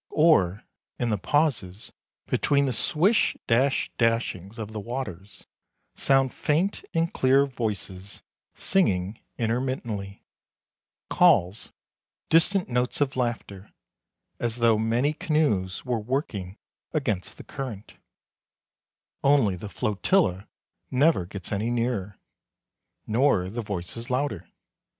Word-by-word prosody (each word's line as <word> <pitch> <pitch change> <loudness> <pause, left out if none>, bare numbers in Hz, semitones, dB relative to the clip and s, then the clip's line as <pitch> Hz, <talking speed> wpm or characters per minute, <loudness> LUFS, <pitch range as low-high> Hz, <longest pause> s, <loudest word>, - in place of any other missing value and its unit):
Or, 105 - +4 0.3
in 120 -2 -1
the 105 - 0
pauses 110 - 0 0.3
between 140 -1 +2
the 130 - 0
swish 175 - +2
dash 130 +3 +2
dashings 115 -3 0
of 110 -2 -6
the 110 - -5
waters, 105 -4 -6 0.5
sound 135 -1 +2
faint 170 +7 0
and 165 +1 +1
clear 135 +2 +4
voices 100 -6 -5 0.3
singing 100 - +1 0.2
intermittently, 115 -4 -3 0.9
calls, 110 - +3 0.6
distant 175 +4 +3
notes 125 0 -1
of 140 -2 0
laughter, 115 -5 -3 0.7
as 115 -1 -1
though 115 -3 +3
many 120 +7 +1
canoes 140 - 0
were 125 -2 0
working 105 - -3 0.4
against 110 - -2
the - - -10
current; 120 -7 -7 1.3
only 135 -9 +4
the 95 +4 -7
flotilla 100 - +1 0.4
never 130 - +3
gets 95 -2 -7
any 105 +3 -1
nearer, 115 -5 -2 0.9
nor 110 -6 +2
the 120 +3 -3
voices 105 +4 -5
louder. 125 - -1
115 Hz, 105 wpm, -26 LUFS, 100-140 Hz, 1.3 s, Or